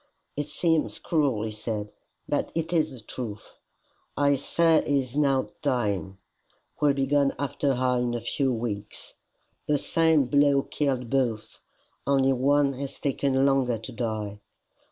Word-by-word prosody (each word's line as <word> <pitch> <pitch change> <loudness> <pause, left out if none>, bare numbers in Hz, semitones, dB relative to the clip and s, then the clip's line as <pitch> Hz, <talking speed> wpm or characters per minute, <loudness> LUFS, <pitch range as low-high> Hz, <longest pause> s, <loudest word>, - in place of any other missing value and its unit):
"It 145 0 -3
seems 160 +1 0
cruel," 140 -10 0
he 110 - -3
said, 105 -1 -5 0.3
"but - - -1
it 165 +1 -2
is 160 -2 +2
the 130 -4 -10
truth. 105 -1 -7 0.6
I 140 0 +4
say 165 +4 +2
he 145 -1 +2
is 125 -1 -9
now 140 -3 +2 0.2
dying 100 - -1 0.6
will 145 -2 +4
be 135 -1 +1
gone 140 0 +2
after 140 -1 -1
her 125 0 +1
in 120 -1 -1
a - - -1
few 135 +2 0
weeks. 110 -4 -5 0.5
The 150 - +3
same 160 -1 +3
blow 140 +1 +3
killed 130 -5 -2
both, 120 -5 -1 0.5
only 135 -1 +3
one 140 +2 +2
has 135 +1 -6
taken 135 -1 +1
longer 135 -4 +2
to 115 +4 -9
die. 110 -4 -4
135 Hz, 150 wpm, -26 LUFS, 120-145 Hz, 0.6 s, I